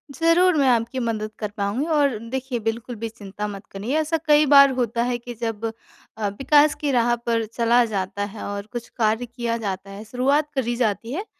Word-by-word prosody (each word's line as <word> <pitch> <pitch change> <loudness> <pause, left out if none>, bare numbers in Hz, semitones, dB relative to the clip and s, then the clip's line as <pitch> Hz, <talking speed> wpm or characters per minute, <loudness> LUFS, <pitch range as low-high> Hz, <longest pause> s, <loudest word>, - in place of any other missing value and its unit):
ज़रूर, 335 +2 +4
मैं 275 -2 +3
आपकी 235 +1 +1
मदद 220 -3 -2
कर 210 - -3
पाऊँगी 205 +8 -1
और 285 -7 +2
देखिए, 260 -1 -3
बिल्कुल 230 +2 -3
भी 225 +1 -5
चिंता 210 -2 -6
मत 200 0 -8
करिए 215 +9 -3
ऐसा 315 +1 0
कई 300 0 +6
बार 280 0 +9
होता 235 0 0
है 245 0 -1
कि 240 +1 -8
जब 225 -1 -3 0.5
अ, 210 - -1
विकास 290 +7 +3
की 290 - 0
राह 240 -1 +3
पर 235 -1 -1
चला 235 +2 +3
जाता 200 -2 -3
है - - -7
और 200 0 -5
कुछ 240 -1 -5
कार्य 225 +1 +1
किया 235 -1 -3
जाता 195 0 -4
है 200 +2 -8
शुरुआत 275 +6 +1
करी 240 -3 0
जाती 230 0 -1
है, 385 +8 -3
235 Hz, 200 wpm, -23 LUFS, 215-265 Hz, 0.5 s, बार